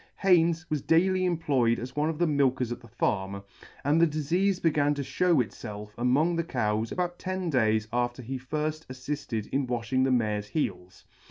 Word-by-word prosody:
Haynes 170 -3 +3
was 150 -2 -1
daily 185 +4 +3
employed 140 -9 +1
as 125 +2 -7
one 150 +2 +1
of 160 - -3
the 175 - +2
milkers 130 -5 +1
at 120 - -4
the 120 - -14
farm, 100 -4 -2 0.4
and 150 +4 +3
the 170 - +6
difeafe 175 +6 0
began 145 -3 +2
to 140 - -3
fhew 165 -3 +2
itfelf 105 +1 -8
among 135 +8 +2
the 170 - +1
cows 110 -7 -1
about 175 -1 -2
ten 185 -2 -3
days 110 -4 +2
after 120 +1 -1
he 130 +3 -4
firfl: 155 +4 -3
affifted 130 -4 -4
in 135 -1 0
walhing 120 +1 0
the 135 - +2
mare's 105 -4 0
heels. 90 - -4
135 Hz, 180 wpm, -28 LUFS, 115-165 Hz, 0.4 s, the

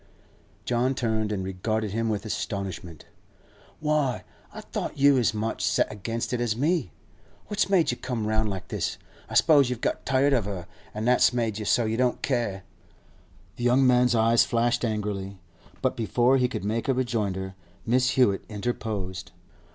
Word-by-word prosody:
John 125 +2 +1
turned 110 -3 -1
and 100 -3 -2
regarded 105 +3 -2
him 115 +2 -1
with 105 -1 -2
astonishment. 95 -6 -5 0.7
'Why, 150 -4 0 0.3
I - - -8
thought - - -5
you 140 0 +6
was 125 -4 +3
as - - -3
much 110 +1 -2
set - - +1
against 115 +4 -4
it 120 - -1
as 115 -2 0
me? 150 - +1 0.6
What's 205 -3 0
made 185 -8 +3
you 120 - -4
come 120 -4 -3
round 110 0 +1
like 95 -2 -6
this? - - -2 0.3
I - - -6
s'pose 145 -5 +5
you've 125 -2 -3
got - - -2
tired 135 +2 +2
of 120 -6 +2
her, 95 -4 -5 0.3
an' 110 +1 -3
that's 125 0 +4
made 115 -3 -1
you 105 - -4
so 120 +3 +2
you 110 +1 -1
don't 125 -1 0
care.' 115 -8 -1 0.9
The 120 - -5
young 125 +2 +4
man's 125 -1 +4
eyes 115 +1 +4
flashed 120 +1 +1
angrily, 105 -3 -3 0.5
but - - +1
before 120 +3 +2
he 125 -1 +2
could 110 -5 -5
make 110 +2 -1
a 135 - +2
rejoinder 105 -7 -2 0.3
Mrs. 125 +2 +3
Hewett 120 -7 +3
interposed. 100 -5 -4
115 Hz, 175 wpm, -26 LUFS, 105-125 Hz, 0.9 s, you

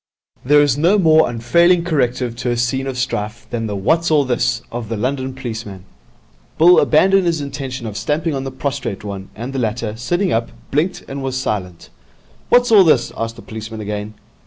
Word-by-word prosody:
There 145 +3 +5
is 145 -1 +1
no 175 +7 +4
more 160 -4 +4
unfailing 170 +10 +3
corrective 125 -7 -1
to 125 0 -2
a 120 - 0
scene 130 +3 -1
of 130 -2 -4
strife 110 -2 -3
than 115 -2 -2
the 105 - -3
'What's 160 - +1
all 150 -3 +3
this?' 125 -1 0
of 115 -2 -5
the 115 - -3
London 130 +3 -2
policeman. 110 -7 -7 0.7
Bill 175 +3 +7
abandoned 190 +4 +4
his 165 -2 +1
intention 135 -3 -5
of 105 -2 -6
stamping 155 +6 -1
on 135 -1 -3
the 135 - -4
prostrate 130 -6 -4
one, 100 -2 -7
and 120 +5 -6
the 135 - -2
latter, 110 -1 -2
sitting 175 - -1
up, 115 +1 0 0.2
blinked 155 +7 0
and 135 0 -6
was 130 -1 -3
silent. 95 -9 -4 0.6
'What's 245 -1 +4
all 205 -3 +8
this?' 150 -8 +3
asked 115 0 -4
the - - -12
policeman 110 0 -8
again. 105 0 -5
130 Hz, 190 wpm, -18 LUFS, 115-150 Hz, 0.7 s, all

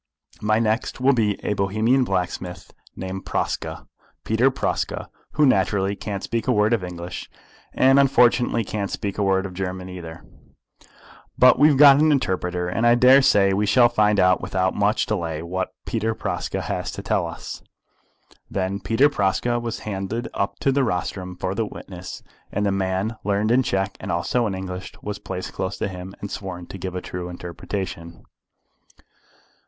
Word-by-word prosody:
My 110 +1 +2
next 110 +2 0
will 135 +2 +4
be 105 -5 +1
a - - +1
Bohemian 110 +6 +2
blacksmith 90 -4 -3 0.2
named 95 0 -5
Praska, - - -3 0.4
Peter 115 +4 +3
Praska, 130 - -2 0.2
who 150 - +4
naturally 100 -4 +2
can't 100 -1 -5
speak 115 +1 -2
a - - +4
word 105 0 +3
of 110 -5 +1
English, 90 0 -6 0.4
and 135 +1 +5
unfortunately 125 -3 +4
can't 100 -1 -3
speak 100 0 -4
a - - +2
word 95 -1 +2
of 95 - -6
German 95 0 -4
either. 80 -3 -9 1.1
But 125 0 +6
we 150 - +7
have 145 -3 +3
got 140 -1 +8
an 155 0 +4
interpreter, 90 -9 0
and 115 +6 +1
I 120 - +6
daresay 125 -6 +5
we 105 +2 +1
shall 120 +2 +5
find 105 -3 +2
out 90 0 +4
without 95 0 0
much 105 +1 +1
delay 85 -6 -2
what 95 +2 -3 0.2
Peter 110 0 -1
Praska - - -3
has - - -3
to - - -7
tell - - 0
us." - - -8 0.9
Then 95 +1 -2
Peter 115 +6 +3
Praska 120 -1 0
was 115 -1 -4
handed 105 +3 -4
up 100 - -2
to 135 - +3
the 135 0 +2
rostrum 90 -3 -3
for 95 +1 -2
the 115 +3 0
witnesses, 90 -3 -9 0.3
and 105 - -1
the 100 - +2
man 95 +3 -1
learned 105 +2 +1
in 125 +2 +5
Czech 95 -4 -1
and - - -5
also 110 +8 0
in 95 - -3
English 95 0 -6
was 105 0 -4
placed 90 -2 -6
close 95 +1 -3
to - - -1
him, 95 0 -8
and 100 - -5
sworn 90 -3 -6
to 95 - -9
give 90 0 -5
a 90 - -3
true 90 0 -6
interpretation. 85 -1 -6
100 Hz, 170 wpm, -23 LUFS, 95-115 Hz, 1.1 s, got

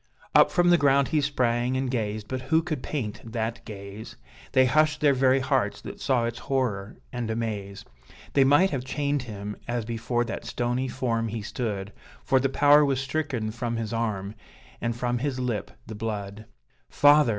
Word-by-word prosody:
Up - - +7
from 175 -1 +3
the 175 - +5
ground 140 -1 +4
he 155 - +2
sprang, 125 -3 +1
and 130 -1 -1
gazed, 110 -3 -2
but 130 +2 -3
who 160 0 +4
could 155 -6 -3
paint 115 -9 -4
that 115 0 -4
gaze? 100 +1 -9 0.4
They 130 0 +6
hushed 155 +4 +3
their 145 -2 +4
very 130 0 +3
hearts, - - 0
that - - -9
saw 125 -3 +2
its 120 0 -4
horror 110 -7 -2 0.2
and 120 -2 -3
amaze; 105 -3 -4 0.5
They 140 - +5
might 145 +8 +5
have 135 -4 -2
chained 145 +1 -1
him, 105 -3 -6
as 120 -1 -2
before 120 +1 -1
that 115 - -5
stony 125 +2 -1
form 115 -3 -1
he 110 -1 -4
stood, 105 -3 -4 0.3
For 130 - +3
the 135 +1 +1
power 145 +2 +6
was 135 -2 +1
stricken 135 -5 -2
from 120 0 -3
his 115 -1 -3
arm, 105 -3 -2 0.5
and 115 0 -1
from 120 0 -1
his 135 -1 -2
lip 120 -5 -2 0.2
the 110 - -8
blood. 105 -1 -5 0.4
"Father!" 145 -2 +5
120 Hz, 180 wpm, -26 LUFS, 110-135 Hz, 0.5 s, Up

